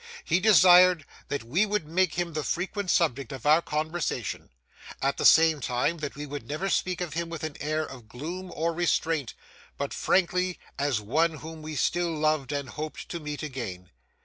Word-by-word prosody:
He 175 - +2
desired 180 -4 +6 0.2
that 145 -4 -3
we 150 - +1
would 210 -5 -1
make 185 +4 +1
him 175 -1 -2
the 155 -1 -2
frequent 190 +4 -2
subject 140 -9 +1
of 135 -4 -8
our 155 +3 +6
conversation; 155 - -3 0.5
at 140 +1 0
the - - -1
same 160 -1 +6
time, 125 +6 -1
that 145 -2 -5
we 145 +1 -6
would 145 0 -7
never 170 +7 -2
speak 180 -1 0
of 175 -5 -3
him 170 +1 -3
with 165 -1 -6
an 155 -2 -4
air 155 +1 -1
of 125 -4 -11
gloom 175 +10 -6
or 165 +1 0
restraint, 160 -5 0 0.4
but - - -3
frankly, 180 0 +1 0.2
and 140 - +1
as 125 -7 +1
one 155 +10 +1
whom 160 +1 -9
we 155 0 -6
still 175 +4 +1
loved 155 -3 0
and 140 -3 -3
hoped 155 +4 -6
to 170 - -4
meet 150 -1 -5
again. 110 - -6
155 Hz, 190 wpm, -27 LUFS, 145-175 Hz, 0.5 s, desired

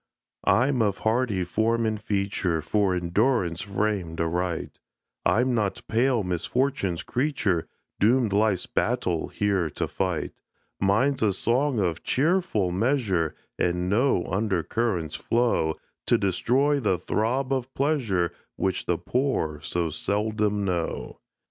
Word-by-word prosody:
I'm 130 +1 +3
of 100 -3 +1
hardy 110 -4 +1
form 115 +6 +1
and 110 -1 -1
feature, 100 -6 -1
For 95 +2 +1
endurance 90 0 +1
framed 100 -4 -2
aright; 85 0 -2 0.5
I'm 125 +2 +2
not 105 -4 -1
pale 120 0 +2
misfortune's 95 +1 -1
creature, 120 - 0 0.3
Doomed 115 0 +3
life's 100 -3 +2
battle 95 -9 0
here 100 -5 0
to - - -3
fight: 90 -4 -2 0.5
Mine's 120 +8 +2
a 105 -3 +3
song 125 +7 +1
of 85 -4 0
cheerful 150 - +1
measure, 95 - +1 0.2
And 90 +1 0
no 115 -4 +2
under 95 -2 0
currents 90 -6 -1
flow 115 -10 +1 0.3
To - - +4
destroy 130 +10 +2
the 105 -7 +1
throb 125 +9 0
of 130 -1 -2
pleasure 120 - +1 0.2
Which 95 -1 -1
the 85 - +1
poor 95 - -1
so 85 0 -1
seldom 105 +3 0
know. 90 -3 -3
105 Hz, 125 wpm, -26 LUFS, 90-120 Hz, 0.5 s, To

